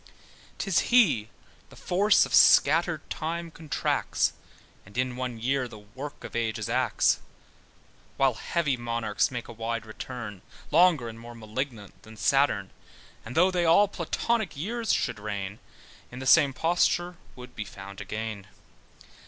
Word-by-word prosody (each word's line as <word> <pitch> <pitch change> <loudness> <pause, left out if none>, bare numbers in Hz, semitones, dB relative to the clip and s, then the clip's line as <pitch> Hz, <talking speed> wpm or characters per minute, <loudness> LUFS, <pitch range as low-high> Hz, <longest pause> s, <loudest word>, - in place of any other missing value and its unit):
'Tis 195 -4 +1
he 150 - +4 0.4
the - - -15
force 200 +4 +3
of - - -8
scattered 160 +2 +5
time 165 +1 -4
contracts, 160 -2 -1 0.5
And 100 +4 -14
in 125 -1 0
one 125 -2 -4
year 130 +2 0
the 110 - -11
work 130 +8 -9
of - - -8
ages 115 -2 -1
acts: - - +2 1.0
While 135 -2 +3
heavy 150 +3 -1
monarchs 115 -2 -1
make 120 -3 -6
a 120 - -9
wide 115 0 -3
return, 110 -3 -7 0.3
Longer, 160 -6 +4
and 115 0 -8
more 120 +1 -10
malignant 110 -1 -6
than 110 0 -14
Saturn: 110 -4 +2 0.5
And 115 - -9
though 180 +3 +5
they 180 -1 +1
all 170 +5 +6
Platonic 200 +1 -2
years 225 +7 -2
should 105 - 0
reign, 100 -1 -5 0.5
In 125 - -10
the 130 - -6
same 145 0 +6
posture 175 +4 +1 0.2
would 125 0 -12
be 110 - -4
found 100 0 -10
again. 110 -2 -5
125 Hz, 145 wpm, -27 LUFS, 110-165 Hz, 1.0 s, all